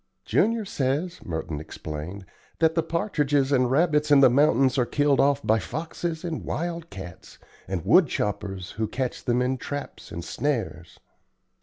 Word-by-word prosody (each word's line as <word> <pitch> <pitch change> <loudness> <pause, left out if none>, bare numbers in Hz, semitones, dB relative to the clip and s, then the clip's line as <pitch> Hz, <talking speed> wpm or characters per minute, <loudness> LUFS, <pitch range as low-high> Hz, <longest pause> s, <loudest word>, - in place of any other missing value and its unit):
"Junior 225 +2 +2
says," 150 +2 -2
Merton 80 -2 -4
explained, 80 +5 -7 0.3
"that 160 -1 +3
the 165 - +2
partridges 150 -5 0
and 130 -3 +3
rabbits 150 +1 +2
in 145 -1 +7
the 130 -3 +7
mountains 135 0 +3
are 125 - +3
killed 145 -1 +2
off 140 0 +3
by 110 +1 +3
foxes 160 - -4
and 170 -3 -4
wild 170 0 -4
cats 90 -3 -10 0.3
and 90 -4 -3
wood 180 -4 +6
choppers 95 -4 -3
who 110 0 -2
catch 130 +1 -3
them 125 +1 +2
in 130 +1 -1
traps 145 +3 -6
and 85 0 -6
snares." 110 - -3
135 Hz, 155 wpm, -25 LUFS, 105-160 Hz, 0.3 s, in